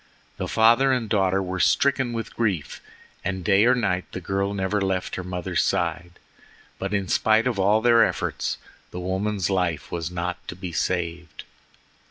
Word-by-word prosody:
The -, -, -3 dB
father 120 Hz, +4 st, +4 dB
and 125 Hz, -4 st, 0 dB
daughter 95 Hz, -2 st, +1 dB
were 95 Hz, 0 st, -4 dB
stricken 135 Hz, +3 st, +2 dB
with 115 Hz, -1 st, -5 dB
grief, 100 Hz, -, -2 dB, 0.4 s
and 95 Hz, -1 st, -3 dB
day 100 Hz, +2 st, +4 dB
or 130 Hz, -, +5 dB
night 95 Hz, -6 st, -1 dB
the -, -, -4 dB
girl 100 Hz, +2 st, -1 dB
never 95 Hz, +1 st, -1 dB
left 95 Hz, -1 st, -1 dB
her 95 Hz, -, -3 dB
mother's 90 Hz, -1 st, -2 dB
side. 85 Hz, 0 st, -1 dB, 0.7 s
But 95 Hz, +1 st, -3 dB
in 100 Hz, -2 st, -1 dB
spite 110 Hz, +4 st, +3 dB
of 120 Hz, -5 st, -1 dB
all 105 Hz, +3 st, +3 dB
their 115 Hz, -1 st, +6 dB
efforts -, -, -1 dB, 0.3 s
the 90 Hz, -, -7 dB
woman's 95 Hz, +1 st, -1 dB
life 90 Hz, -6 st, -1 dB
was 85 Hz, -1 st, -3 dB
not 90 Hz, 0 st, -4 dB
to -, -, -6 dB
be 90 Hz, -1 st, -6 dB
saved. 85 Hz, -1 st, -3 dB
95 Hz, 170 wpm, -24 LUFS, 90-110 Hz, 0.7 s, their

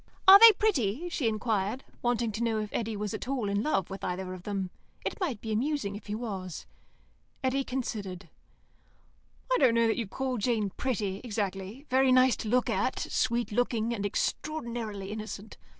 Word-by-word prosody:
"Are 390 Hz, +1 st, +12 dB
they 460 Hz, +1 st, +11 dB
pretty?" 315 Hz, -, 0 dB
she 295 Hz, -7 st, -1 dB
inquired, 215 Hz, +1 st, -1 dB, 0.2 s
wanting 240 Hz, -2 st, +1 dB
to 215 Hz, +2 st, -5 dB
know 230 Hz, -2 st, +1 dB
if 210 Hz, -1 st, -4 dB
Eddy 225 Hz, -2 st, -2 dB
was 210 Hz, -1 st, -3 dB
at -, -, -5 dB
all 255 Hz, -6 st, -1 dB
in 200 Hz, +1 st, 0 dB
love 195 Hz, -, 0 dB
with 195 Hz, -, -7 dB
either 185 Hz, +1 st, -3 dB
of 185 Hz, -, -8 dB
them. 195 Hz, -2 st, -3 dB, 0.3 s
It -, -, -3 dB
might 285 Hz, -, -2 dB
be 220 Hz, -, -4 dB
amusing 230 Hz, -2 st, -1 dB
if 205 Hz, 0 st, -10 dB
he 210 Hz, -, -2 dB
was. 195 Hz, -7 st, -5 dB, 0.8 s
Eddy 265 Hz, +1 st, +1 dB
considered. 205 Hz, -9 st, -4 dB, 1.3 s
"I -, -, +4 dB
don't 250 Hz, -4 st, +5 dB
know 230 Hz, 0 st, +4 dB
that 225 Hz, -, +1 dB
you'd 230 Hz, -5 st, -3 dB
call 260 Hz, +2 st, -2 dB
Jane 215 Hz, -3 st, 0 dB
pretty, 205 Hz, -6 st, -2 dB
exactly. 205 Hz, +2 st, -4 dB
Very 260 Hz, 0 st, +4 dB
nice 255 Hz, 0 st, +5 dB
to 215 Hz, -, -4 dB
look 250 Hz, +2 st, +2 dB
at. -, -, 0 dB
Sweet 235 Hz, -1 st, 0 dB
looking, 235 Hz, 0 st, 0 dB
and 205 Hz, -4 st, -3 dB
extraordinarily 225 Hz, -4 st, -3 dB
innocent." 215 Hz, 0 st, -7 dB
225 Hz, 180 wpm, -29 LUFS, 200-255 Hz, 1.3 s, Are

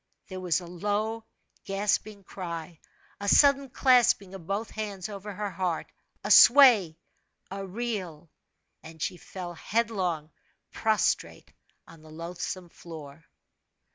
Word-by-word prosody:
There 185 Hz, -1 st, -6 dB
was 180 Hz, -2 st, 0 dB
a -, -, -9 dB
low, 210 Hz, +6 st, -2 dB, 0.4 s
grasping 200 Hz, +1 st, -1 dB
cry 170 Hz, -4 st, -7 dB, 0.4 s
a 200 Hz, -, -5 dB
sudden 280 Hz, +1 st, +5 dB
clasping 245 Hz, -7 st, +3 dB
of 180 Hz, -4 st, -10 dB
both 205 Hz, +3 st, -3 dB
hands 205 Hz, -4 st, -5 dB
over 205 Hz, 0 st, -7 dB
her 205 Hz, 0 st, -4 dB
heart, 180 Hz, -2 st, -3 dB, 0.3 s
a 205 Hz, -, -2 dB
sway, 225 Hz, -, +7 dB, 0.5 s
a 195 Hz, 0 st, -5 dB
reel, 185 Hz, -7 st, -5 dB, 0.5 s
and 160 Hz, 0 st, -13 dB
she 180 Hz, -, -3 dB
fell 175 Hz, 0 st, -8 dB
headlong 180 Hz, -6 st, -2 dB, 0.4 s
prostrate 220 Hz, -1 st, -1 dB, 0.3 s
on 165 Hz, -1 st, -15 dB
the 155 Hz, -, -15 dB
loathsome 170 Hz, +2 st, -6 dB
floor. 160 Hz, -2 st, -11 dB
190 Hz, 120 wpm, -27 LUFS, 170-215 Hz, 0.5 s, sway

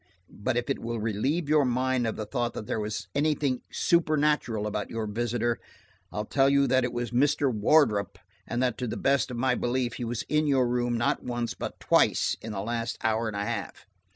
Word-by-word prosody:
But 105 Hz, +4 st, -2 dB
if 120 Hz, -, -1 dB
it 135 Hz, -, -1 dB
will 115 Hz, 0 st, -3 dB
relieve 120 Hz, -, -1 dB
your 150 Hz, 0 st, +4 dB
mind 130 Hz, -1 st, +1 dB
of 110 Hz, -, -2 dB
the 110 Hz, -, -4 dB
thought 120 Hz, +1 st, -2 dB
that -, -, -5 dB
there 110 Hz, -, -2 dB
was 105 Hz, -2 st, -4 dB
anything 145 Hz, -3 st, +1 dB
supernatural 150 Hz, -9 st, +1 dB
about 105 Hz, 0 st, -3 dB
your 115 Hz, -1 st, -3 dB
visitor, 120 Hz, +2 st, -1 dB, 0.5 s
I'll 105 Hz, -, -3 dB
tell 135 Hz, +4 st, +3 dB
you 140 Hz, 0 st, +4 dB
that 130 Hz, -1 st, +3 dB
it 125 Hz, -, -1 dB
was 120 Hz, -1 st, -3 dB
Mr. 140 Hz, +1 st, +2 dB
Wardrop, 105 Hz, -2 st, +3 dB, 0.3 s
and 120 Hz, +2 st, -1 dB
that 125 Hz, -2 st, 0 dB
to 125 Hz, -, -2 dB
the -, -, -4 dB
best 140 Hz, 0 st, +2 dB
of 125 Hz, -, -5 dB
my 130 Hz, +1 st, +2 dB
belief 120 Hz, -1 st, -1 dB
he 125 Hz, -, -4 dB
was 120 Hz, -1 st, -3 dB
in 150 Hz, 0 st, +1 dB
your 130 Hz, -3 st, +3 dB
room, 120 Hz, -1 st, 0 dB
not 120 Hz, -, +1 dB
once, 120 Hz, -1 st, -3 dB
but -, -, -6 dB
twice, -, -, +3 dB
in 110 Hz, -, -6 dB
the 100 Hz, -2 st, -3 dB
last 115 Hz, +1 st, -2 dB
hour 110 Hz, +1 st, +1 dB
and 105 Hz, -2 st, -4 dB
a 100 Hz, -, -1 dB
half. -, -, -5 dB
120 Hz, 210 wpm, -27 LUFS, 110-135 Hz, 0.5 s, your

